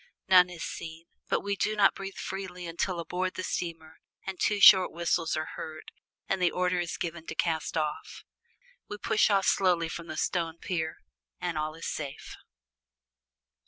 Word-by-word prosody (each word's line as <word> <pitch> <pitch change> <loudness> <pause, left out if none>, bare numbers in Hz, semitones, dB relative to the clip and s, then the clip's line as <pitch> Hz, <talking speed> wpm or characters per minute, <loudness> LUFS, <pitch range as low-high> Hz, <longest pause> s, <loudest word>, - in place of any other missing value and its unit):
None 180 -1 +7
is 175 -2 -7
seen, 165 0 -7 0.2
but - - +1
we 200 0 -1
do 215 +2 0
not 205 -2 +5
breathe 195 0 -7
freely 185 -2 -5
until 170 +1 -2
aboard 180 +3 -2
the 185 - -4
steamer 165 -3 -4 0.3
and 190 -1 -5
two 210 -1 +2
short 190 -2 +9
whistles 170 -1 0
are 155 +1 -3
heard, 155 -1 -8 0.4
and 190 -1 0
the 180 - +5
order 180 0 0
is 175 -1 -3
given 165 -1 -5
to - - -5
cast 165 -1 -1
off. 150 -1 -3 0.7
We 210 - -5
push 215 +1 +2
off 195 -2 +3
slowly 175 -4 +3
from 170 +1 -6
the 155 - -6
stone 165 -2 -1
pier, 160 -3 -3 0.4
and 175 -2 -2
all 155 0 -2
is 165 - -8
safe. 140 -3 -5
175 Hz, 170 wpm, -29 LUFS, 160-185 Hz, 0.7 s, short